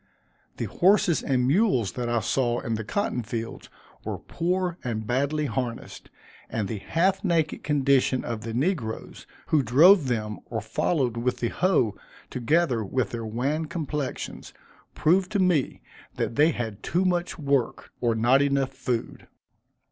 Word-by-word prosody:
The -, -, -2 dB
horses 185 Hz, -2 st, +3 dB
and 125 Hz, -2 st, +1 dB
mules 140 Hz, -, +2 dB
that 120 Hz, -1 st, -3 dB
I 120 Hz, -1 st, +1 dB
saw 120 Hz, +2 st, 0 dB
in 115 Hz, -, -3 dB
the 110 Hz, 0 st, -2 dB
cotton 165 Hz, -, -1 dB
fields, 115 Hz, 0 st, -6 dB, 0.3 s
were -, -, -4 dB
poor 180 Hz, 0 st, -2 dB
and 110 Hz, -4 st, -3 dB
badly 140 Hz, +6 st, 0 dB
harnessed, 125 Hz, -4 st, -4 dB, 0.4 s
and 105 Hz, -3 st, -2 dB
the 110 Hz, -1 st, -4 dB
half 185 Hz, -, +1 dB
naked 165 Hz, -5 st, 0 dB
condition 135 Hz, -3 st, +2 dB
of 115 Hz, -2 st, -4 dB
the 115 Hz, -, -5 dB
negroes, 130 Hz, -, -2 dB, 0.2 s
who 155 Hz, -, +4 dB
drove 150 Hz, -, +6 dB
them, 105 Hz, -4 st, -2 dB
or 115 Hz, -, -2 dB
followed 125 Hz, +2 st, -1 dB
with 125 Hz, +2 st, -1 dB
the 120 Hz, -, -1 dB
hoe, 170 Hz, -, +1 dB, 0.4 s
together 125 Hz, -1 st, +1 dB
with 115 Hz, +1 st, -1 dB
their 115 Hz, -2 st, -4 dB
wan 135 Hz, +8 st, -1 dB
complexions, 150 Hz, -4 st, -5 dB, 0.4 s
proved 185 Hz, +4 st, +2 dB
to 205 Hz, -, +2 dB
me 180 Hz, -7 st, +1 dB, 0.3 s
that -, -, -2 dB
they 150 Hz, +5 st, +5 dB
had 115 Hz, -8 st, -4 dB
too 180 Hz, +3 st, 0 dB
much 175 Hz, -1 st, 0 dB
work, 140 Hz, -5 st, -1 dB
or 115 Hz, -2 st, +2 dB
not 120 Hz, +5 st, +4 dB
enough 140 Hz, -1 st, +1 dB
food. 120 Hz, -3 st, -4 dB
130 Hz, 150 wpm, -26 LUFS, 115-165 Hz, 0.4 s, drove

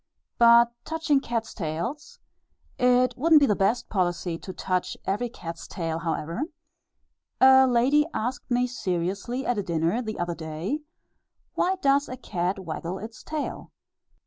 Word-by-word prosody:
But 235 Hz, 0 st, +7 dB
touching 320 Hz, -3 st, +1 dB
cats' 230 Hz, -3 st, -3 dB
tails 170 Hz, -, -4 dB, 0.6 s
(it 250 Hz, 0 st, +3 dB
wouldn't 315 Hz, +4 st, +5 dB
be 285 Hz, -, +4 dB
the 210 Hz, -, +2 dB
best 205 Hz, +6 st, +1 dB
policy 175 Hz, -3 st, -1 dB
to 190 Hz, -, -7 dB
touch 185 Hz, -1 st, -2 dB
every 220 Hz, +5 st, -1 dB
cat's 170 Hz, -7 st, -8 dB
tail 165 Hz, -3 st, -3 dB
however), 165 Hz, -, -3 dB, 1.0 s
a 265 Hz, 0 st, +7 dB
lady 260 Hz, +5 st, +3 dB
asked 250 Hz, +1 st, -3 dB
me 245 Hz, 0 st, +2 dB
seriously 200 Hz, +2 st, -3 dB
at 225 Hz, -5 st, 0 dB
dinner 170 Hz, +6 st, 0 dB
the 220 Hz, -3 st, -5 dB
other 175 Hz, 0 st, -2 dB
day, 165 Hz, -, -4 dB, 0.7 s
"Why 375 Hz, +1 st, +1 dB
does 280 Hz, +1 st, +3 dB
a 255 Hz, -, -6 dB
cat 180 Hz, -5 st, -2 dB
waggle 175 Hz, 0 st, -5 dB
its 220 Hz, +2 st, -9 dB
tail?" 305 Hz, -2 st, -5 dB
225 Hz, 140 wpm, -26 LUFS, 175-255 Hz, 1.0 s, But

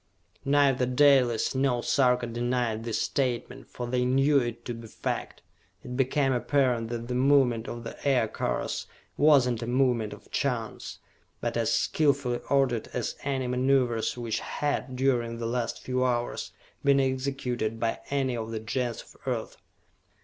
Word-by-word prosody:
Neither 140 Hz, -3 st, +3 dB
Dalis 125 Hz, -3 st, +4 dB
nor 130 Hz, -3 st, +1 dB
Sarka 125 Hz, -2 st, +3 dB
denied 120 Hz, -1 st, -1 dB
this 115 Hz, -2 st, -1 dB
statement, 125 Hz, -4 st, -2 dB
for 125 Hz, -, -5 dB
they 125 Hz, +1 st, 0 dB
knew 135 Hz, +3 st, +4 dB
it 120 Hz, -2 st, -4 dB
to 120 Hz, -, -3 dB
be 115 Hz, 0 st, -9 dB
fact. -, -, -4 dB, 0.4 s
It 125 Hz, -, -6 dB
became 135 Hz, +1 st, +2 dB
apparent 125 Hz, -3 st, +1 dB
that 120 Hz, 0 st, -4 dB
the 125 Hz, -, -3 dB
movement 125 Hz, -3 st, +3 dB
of 120 Hz, 0 st, -6 dB
the 115 Hz, -, -7 dB
Aircars 130 Hz, -6 st, 0 dB, 0.3 s
was 145 Hz, -3 st, +5 dB
not 120 Hz, -2 st, -1 dB
a 115 Hz, -, -4 dB
movement 120 Hz, -4 st, +1 dB
of 105 Hz, -, -12 dB
chance, 120 Hz, -5 st, -2 dB, 0.4 s
but -, -, -2 dB
as -, -, +1 dB
skillfully 140 Hz, -5 st, +1 dB
ordered 135 Hz, -5 st, +2 dB
as 125 Hz, -, -2 dB
any 135 Hz, -2 st, -1 dB
maneuvers 125 Hz, -2 st, +1 dB
which 115 Hz, -2 st, -2 dB
had, 145 Hz, -3 st, -2 dB
during 120 Hz, -3 st, +1 dB
the 115 Hz, -, -4 dB
last 120 Hz, 0 st, -2 dB
few 130 Hz, 0 st, 0 dB
hours, 120 Hz, -1 st, -1 dB, 0.3 s
been 140 Hz, -1 st, +4 dB
executed 130 Hz, -4 st, -1 dB
by 115 Hz, -1 st, -1 dB
any 135 Hz, -3 st, 0 dB
of 115 Hz, -1 st, -4 dB
the 115 Hz, -1 st, -3 dB
Gens 120 Hz, +2 st, -3 dB
of -, -, -19 dB
Earth. -, -, -3 dB
125 Hz, 155 wpm, -28 LUFS, 120-135 Hz, 0.4 s, was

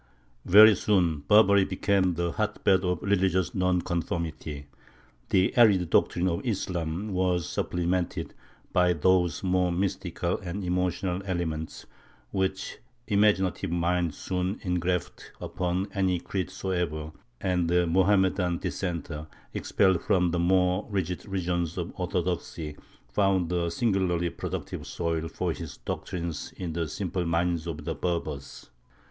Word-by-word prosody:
Very 105 Hz, +3 st, +9 dB
soon 90 Hz, -8 st, +2 dB
Barbary 100 Hz, -2 st, +6 dB
became 95 Hz, -2 st, +1 dB
the 85 Hz, 0 st, -1 dB
hotbed 100 Hz, -2 st, +1 dB
of 90 Hz, -1 st, -1 dB
religious 95 Hz, -3 st, +1 dB
nonconformity; 85 Hz, -5 st, -2 dB, 0.6 s
the 95 Hz, 0 st, +2 dB
arid 100 Hz, -8 st, +5 dB
doctrines 90 Hz, +1 st, +3 dB
of 85 Hz, -, -2 dB
Islam 95 Hz, -3 st, -2 dB
were 90 Hz, -1 st, +2 dB
supplemented 90 Hz, +1 st, -2 dB, 0.4 s
by 90 Hz, 0 st, +4 dB
those 90 Hz, +1 st, +2 dB
more 90 Hz, -1 st, +2 dB
mystical 90 Hz, -1 st, -1 dB
and 95 Hz, 0 st, -5 dB
emotional 90 Hz, +1 st, -1 dB
elements 80 Hz, -4 st, -3 dB, 0.5 s
which 95 Hz, 0 st, -2 dB, 0.3 s
imaginative 100 Hz, -3 st, +2 dB
minds 85 Hz, -2 st, 0 dB
soon 90 Hz, +2 st, -2 dB
engraft 90 Hz, -1 st, -2 dB
upon 90 Hz, +1 st, -2 dB
any 95 Hz, -3 st, +1 dB
creed 95 Hz, +1 st, -3 dB
soever; 90 Hz, -5 st, -3 dB, 0.3 s
and 90 Hz, -3 st, 0 dB
the 90 Hz, 0 st, +3 dB
Mohammedan 95 Hz, 0 st, +2 dB
dissenter, 85 Hz, -5 st, -4 dB, 0.3 s
expelled 95 Hz, -4 st, +2 dB
from 90 Hz, -4 st, +2 dB
the 85 Hz, -, 0 dB
more 90 Hz, +2 st, +2 dB
rigid 95 Hz, -2 st, -3 dB
regions 85 Hz, -3 st, -2 dB
of 85 Hz, -1 st, -4 dB
orthodoxy, 85 Hz, -4 st, -3 dB, 0.3 s
found 90 Hz, +6 st, +1 dB
a 85 Hz, -1 st, 0 dB
singularly 90 Hz, -4 st, 0 dB
productive -, -, -5 dB
soil 80 Hz, -1 st, -2 dB
for -, -, -2 dB
his -, -, -8 dB
doctrines 85 Hz, -3 st, -5 dB
in 85 Hz, -3 st, -4 dB
the 85 Hz, -1 st, -1 dB
simple 90 Hz, +1 st, -3 dB
minds 85 Hz, 0 st, 0 dB
of 80 Hz, -2 st, -5 dB
the 80 Hz, -, -1 dB
Berbers. 80 Hz, -3 st, -4 dB
90 Hz, 120 wpm, -27 LUFS, 85-95 Hz, 0.6 s, Very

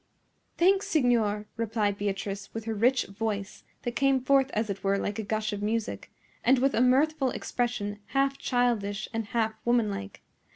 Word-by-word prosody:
"Thanks, 385 Hz, +3 st, +3 dB
signor," 230 Hz, -7 st, +2 dB
replied 215 Hz, -3 st, 0 dB
Beatrice, 200 Hz, 0 st, -3 dB
with 225 Hz, -1 st, -4 dB
her 225 Hz, -, -2 dB
rich 245 Hz, +5 st, +2 dB
voice, 205 Hz, 0 st, -4 dB, 0.2 s
that 240 Hz, -, -1 dB
came 275 Hz, -2 st, +3 dB
forth 270 Hz, +1 st, +3 dB
as 215 Hz, +1 st, +1 dB
it 200 Hz, -1 st, -5 dB
were 195 Hz, 0 st, +2 dB
like 205 Hz, +1 st, -3 dB
a -, -, -2 dB
gush 215 Hz, +1 st, -2 dB
of 205 Hz, -, -4 dB
music, 220 Hz, +1 st, -2 dB, 0.3 s
and 260 Hz, +3 st, +5 dB
with 270 Hz, +2 st, +2 dB
a 230 Hz, -, +2 dB
mirthful 270 Hz, +2 st, +3 dB
expression 235 Hz, -5 st, -2 dB
half 275 Hz, +2 st, +1 dB
childish 220 Hz, -5 st, 0 dB
and 225 Hz, -1 st, -2 dB
half 220 Hz, 0 st, 0 dB
woman 235 Hz, -3 st, +2 dB
like. 200 Hz, 0 st, -7 dB
225 Hz, 170 wpm, -28 LUFS, 205-255 Hz, 0.3 s, and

